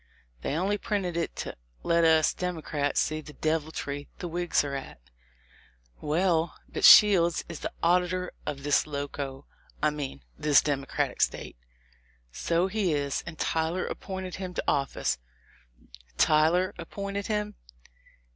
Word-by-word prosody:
They 140 - -2
only 195 +5 0
printed 190 -5 -2
it 170 -1 -2
to - - -5 0.3
let 170 0 +3
us 160 -1 +4
Democrats 155 -5 -2
see 155 0 0
the 150 -1 -12
deviltry 155 -2 -2
the 175 - -5
Whigs 175 -1 +1
are 140 -1 -4
at." 135 - -6 1.0
"Well, 165 +1 +1
but - - -5
Shields 180 -5 +7
is 170 -3 -7
the - - -4
auditor 180 +1 +2
of 140 -2 -5
this 145 +1 +2
Loco 140 -1 -5 0.2
— - - -28
I 150 - +4
mean 140 - -6 0.2
this 150 -2 +5
Democratic 140 -2 -1
State." - - -1 0.8
"So 170 - 0
he 190 -3 0
is, 140 -1 -1
and 165 -2 -7
Tyler 165 +4 0
appointed 190 -2 -5
him 185 -1 -6
to - - -1
office." 140 - 0 1.0
"Tyler 160 +4 +3
appointed 200 +3 -5
him?" 210 -1 -1
165 Hz, 135 wpm, -28 LUFS, 145-180 Hz, 1.0 s, Shields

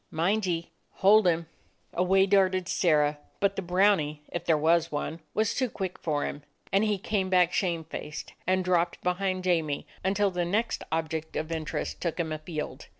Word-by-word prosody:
Mind 190 +6 +1
ye 170 -1 -2 0.2
hold 205 +1 +5
him!" 165 -1 +2 0.5
Away 190 +2 +3
darted 185 -2 +3
Sirrah, 150 -4 +2 0.2
but 200 0 +2
the - - -2
brownie, 180 -5 +2
if 175 0 -4
there 160 -2 +3
was 165 +2 +2
one, 155 +2 -3 0.2
was 215 0 +2
too 255 -2 0
quick 190 -4 -5
for 150 -3 -1
him, 145 - -5 0.3
and 195 +2 +4
he 210 -2 +1
came 190 -1 -1
back, 180 -2 +4
shamefaced, 165 -4 -3
and 185 0 +2
dropped 175 -1 +1
behind 185 +1 0
Jamie, 165 -5 0 0.2
until 200 +1 +2
the 180 -1 -1
next 210 +7 -1
object 160 0 -2
of 155 +1 -3
interest 160 -1 -3
took 170 0 -2
him 160 -2 -1
afield. 155 0 -5
180 Hz, 170 wpm, -28 LUFS, 160-195 Hz, 0.5 s, hold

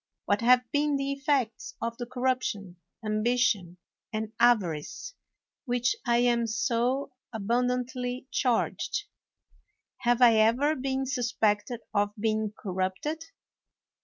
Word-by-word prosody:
What 205 0 +1
have 250 +1 +5
been 295 0 +2
the 275 0 -1
effects 275 -5 -1
of 230 0 -3
the 240 - -4
corruption, 245 -7 -2 0.3
ambition, 215 -4 +1 0.3
and 220 0 -3
avarice 220 - +1 0.5
with 245 0 +1
which 245 - +2
I 235 0 +4
am 240 -1 +2
so 240 +4 0 0.2
abundantly 250 +3 -1
charged? 255 - 0 0.9
Have 240 0 +2
I 230 -2 +7
ever 245 +8 +3
been 265 0 -1
suspected 235 -3 0
of 205 0 +1
being 215 -1 0
cor 210 -3 -7
rupted? 190 - -2
240 Hz, 115 wpm, -28 LUFS, 215-255 Hz, 0.9 s, I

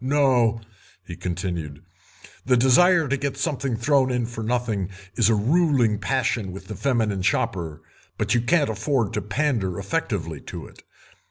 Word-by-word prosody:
No," 130 -5 +2 0.4
he 85 - -7
continued, 85 -5 -4 0.6
"the 125 -1 +3
desire 160 +7 +5
to 140 +2 0
get 140 0 -3
something 140 -6 -1
thrown 130 +2 +2
in 125 -2 0
for 115 -1 -6
nothing 110 -5 -1 0.2
is 110 +2 +3
a 115 - +4
ruling 125 - +2
passion 115 -5 -1
with 95 - -9
the 105 - -7
feminine 110 -8 0
shopper, 90 -7 -1 0.3
but - - 0
you 120 - +3
can't 145 +1 +2
afford 110 +1 -1
to - - -1
pander 105 -6 -1
effectively - - -3
to - - -8
it. - - -16
120 Hz, 155 wpm, -24 LUFS, 100-135 Hz, 0.6 s, desire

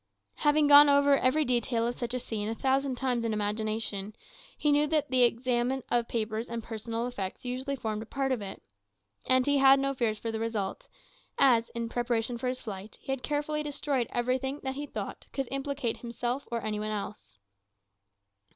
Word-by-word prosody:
Having 295 0 +3
gone 290 0 +9
over 285 0 +5
every 275 +4 +2
detail 240 -2 +1
of 240 - 0
such 245 0 -3
a - - 0
scene 215 -3 -3
a 225 - -2
thousand 270 +1 +1
times 250 -2 -1
in 225 -1 0
imagination, 215 -1 -2 0.4
he 295 - +2
knew 295 +1 +4
that 300 -3 0
the 255 -1 +3
examination 245 +1 +1
of 240 -1 +2
papers 220 0 -2
and 230 -1 -4
personal 230 +1 -4
effects 205 -3 -5
usually 260 +3 -2
formed 220 -4 -3
a 220 - -8
part 270 +2 -1
of 250 -4 0
it. 195 - -8 0.6
And 255 0 +4
he 285 -1 +3
had 270 0 +7
no 275 0 0
fears 230 -4 0
for 225 +1 -4
the 220 - -3
result, 220 -4 -3 0.5
as, 235 -4 +4
in 235 0 -2
preparation 240 0 -1
for 255 - -2
his 255 0 -2
flight, 205 -1 -8
he - - -5
had 270 -1 -2
carefully 295 +1 -1
destroyed 285 -4 -1
everything 260 +3 -1
that 265 0 -2
he 290 +2 -5
thought - - -6
could 270 -2 -2
implicate 275 -3 -2
himself 240 +3 -3
or 235 -1 -2
any 215 -1 -2
one 215 0 -3
else. 200 - -6
245 Hz, 190 wpm, -29 LUFS, 225-270 Hz, 0.6 s, gone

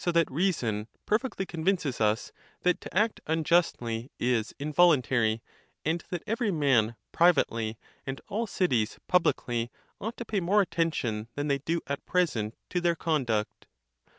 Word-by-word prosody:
469 170 -2 +3
that 130 - -12
reason 110 - -1 0.2
perfectly 215 -3 0
convinces 165 -7 -1
us, 105 +1 +1 0.3
that 180 -1 +2
to - - -6
act 215 +2 +2
unjustly 155 -7 +1
is 120 -3 +1
in 150 +2 -4
voluntary; 130 -9 +4 0.4
and 165 +3 0
that 175 -2 -4
every 225 +1 0
man 135 - +2 0.2
privately, 115 -10 +3 0.3
and 135 0 -5
all 225 +3 -2
cities 125 - +1
pub 180 -2 +4
licly, 120 -1 0 0.3
ought 225 +4 -4
to 235 - -5
pay 210 -3 0
more 190 +4 +3
attention 140 - -1
than 145 +1 -2
they 140 -1 +2
do. 165 +4 -1
at 140 +1 -4
present 120 -12 +1
to 180 - -1
their 170 -1 +2
conduct." 125 -11 -1
155 Hz, 150 wpm, -28 LUFS, 115-180 Hz, 0.4 s, voluntary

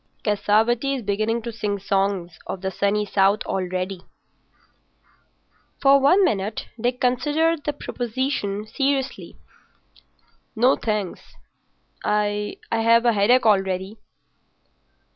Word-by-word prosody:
Cassavetti 220 +6 +1
is 255 - -5
beginning 215 +3 -1
to 235 - -4
sing 210 -2 -3
songs 195 -4 -1
of 190 - -5
the 190 0 -2
Sunny 200 +3 0
South 200 +1 +2
already." 185 0 -3 1.8
For 275 0 +5
one 360 +9 +5
minute 210 - -2 0.2
Dick 245 +2 0
considered 295 +5 +1
the 295 - -1
proposition 240 -6 -3
seriously. 270 +4 -2 1.2
"No, 245 +4 +4
thanks, 210 -5 -4 0.7
I've 210 0 -1
a 230 +1 +4
headache 225 +5 +3
already." 195 0 +1
215 Hz, 100 wpm, -23 LUFS, 200-250 Hz, 1.8 s, For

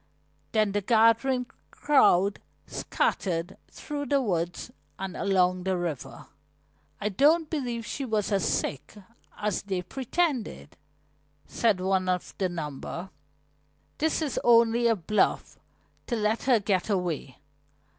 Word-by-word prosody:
Then 215 -2 +2
the 205 +1 0
gathering 230 +4 +3 0.2
crowd 200 -9 +3 0.3
scattered 175 0 -1
through 290 -1 -6
the 285 -1 +3
woods 175 -8 -2 0.3
and 190 -1 -5
along 185 -2 +2
the 190 0 -1
river. 170 -7 -5 0.7
"I 210 - -1
don't 300 - +3
believe 245 -7 -3
she 275 - -4
was 215 -4 -1
as 195 -3 +1
sick 140 +1 -2 0.4
as 210 -2 -1
they 190 -2 -3
pretended," 255 - -2 0.7
said 220 -5 +1
one 185 0 0
of 180 -1 -2
the 190 -2 +1
number. 170 +2 -6 0.9
"This 320 +1 +1
is 290 - -2
only 235 0 +5
a 230 - +3
bluff 210 +3 0 0.5
to 240 - -1
let 215 0 0
her 250 -4 +4
get 195 -1 0
away. 175 -9 -2
205 Hz, 125 wpm, -27 LUFS, 180-240 Hz, 0.9 s, only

